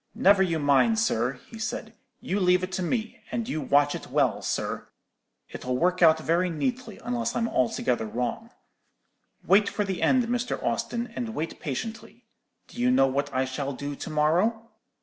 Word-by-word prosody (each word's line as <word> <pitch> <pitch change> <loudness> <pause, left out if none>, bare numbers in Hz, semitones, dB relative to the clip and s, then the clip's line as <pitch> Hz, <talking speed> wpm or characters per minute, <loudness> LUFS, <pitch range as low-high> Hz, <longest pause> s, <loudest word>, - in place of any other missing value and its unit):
"'Never 200 0 +5
you 170 -4 +2
mind, 145 - +3
sir,' 125 - +1
he 225 - -11
said; 225 0 -4 0.3
you 195 - -1
leave 180 -1 +3
it 185 - -3
to 190 0 -2
me, 220 +5 -2
and 230 -1 -2
you 155 - -2
watch 145 +1 +3
it - - -6
well, - - +1
sir. - - -3 0.6
It'll 125 0 -3
work 180 +4 +1
out 160 -2 +7
very 170 +3 +1
neatly, 240 - -3
unless 240 0 -2
I'm 230 -1 +1
altogether 125 - 0
wrong. 125 - -3 1.0
Wait 205 +2 +5
for 210 - -1
the 190 -3 -3
end, 255 -1 +4
Mr. 245 +1 -1
Austin, 240 0 -2
and 230 -2 -4
wait 160 +2 -4
patiently. 220 - -6 0.4
Do 240 - -7
you 250 - +3
know 255 - +5
what 140 +2 -1
I 130 0 +1
shall 135 +2 -3
do 145 +2 -5
to - - -7
morrow?' 180 +10 +1
180 Hz, 175 wpm, -26 LUFS, 145-230 Hz, 1.0 s, out